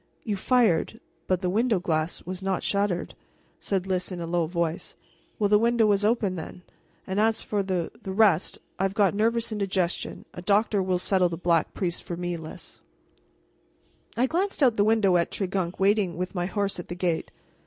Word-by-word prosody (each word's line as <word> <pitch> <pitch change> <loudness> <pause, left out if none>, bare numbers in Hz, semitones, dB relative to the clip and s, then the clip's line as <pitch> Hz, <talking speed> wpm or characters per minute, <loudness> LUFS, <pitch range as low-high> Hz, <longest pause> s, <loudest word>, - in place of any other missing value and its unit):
"You 210 -3 -1
fired 225 -1 +2 0.3
but 185 -1 +1
the 180 - 0
window 225 0 +2
glass 160 -1 -1
was 185 +1 -5
not 190 -1 -1
shattered," 200 -3 0 0.5
said 190 -2 -1
Lys 185 -1 -1
in 180 - -5
a 170 - -3
low 170 -1 0
voice. 170 -1 -2 0.4
"Well, 210 - +2
the 210 0 +5
window 235 0 +3
was 205 -1 +2
open, 210 -4 +1
then. 175 +2 -8 0.4
And 190 +1 -2
as 225 +1 +2
for 205 -1 -1
the 185 -3 -2
the 190 - -5
rest 195 -4 +3 0.2
I've 195 +1 0
got 205 -2 +3
nervous 230 +2 +1
indigestion, 195 -4 -1
and - - -14
a 180 - -7
doctor 205 +2 +2
will 185 -1 +1
settle 180 0 +2
the 165 - -4
Black 170 -1 +1
Priest 175 -3 -2
for 170 - -5
me, 175 0 -2
Lys." 160 -2 -9 1.4
I 245 - +4
glanced 350 +3 0
out 250 -4 +5
of - - -17
the 205 - +4
window 210 -4 +4
at 170 - +1
Tregunc 190 -2 -2
waiting 195 -3 +2
with 180 +2 -3
my 175 -2 -1
horse 200 -1 -1
at 175 - -7
the 175 - -5
gate. 175 -2 -1
190 Hz, 195 wpm, -26 LUFS, 175-210 Hz, 1.4 s, the